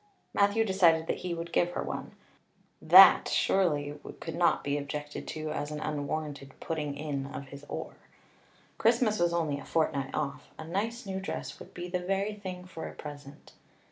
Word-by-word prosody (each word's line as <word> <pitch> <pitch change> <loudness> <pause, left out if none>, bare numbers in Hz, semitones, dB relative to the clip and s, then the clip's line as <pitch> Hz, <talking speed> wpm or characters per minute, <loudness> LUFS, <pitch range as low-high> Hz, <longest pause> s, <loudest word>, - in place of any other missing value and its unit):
Matthew 205 +3 +3
decided 170 -5 +4
that - - -1
he 175 -2 -3
would 170 0 -6
give 175 0 +2
her - - -2
one; - - -5 0.7
that - - +9
surely 150 -6 +1 0.2
could 165 - -5
not 170 +1 +2
be 140 0 0
objected 145 +1 -5
to 155 -1 -4
as 145 0 -3
an 150 0 -4
unwarranted 145 -2 -4
putting 150 -3 -3
in 140 -2 -3
of 140 -1 -7
his 140 +1 -10
oar. - - -5 0.9
Christmas 230 -2 +3
was 175 0 +3
only 160 -4 0
a - - -9
fortnight 140 -4 0
off. 140 -2 -3
A - - -7
nice 210 +9 -3
new 190 -1 -3
dress 195 - -5
would - - -13
be 175 0 -5
the 180 0 -1
very 195 +3 -1
thing 185 -3 -7
for 170 -3 -7
a - - -9
present. 145 -1 -10
160 Hz, 175 wpm, -30 LUFS, 145-185 Hz, 0.9 s, that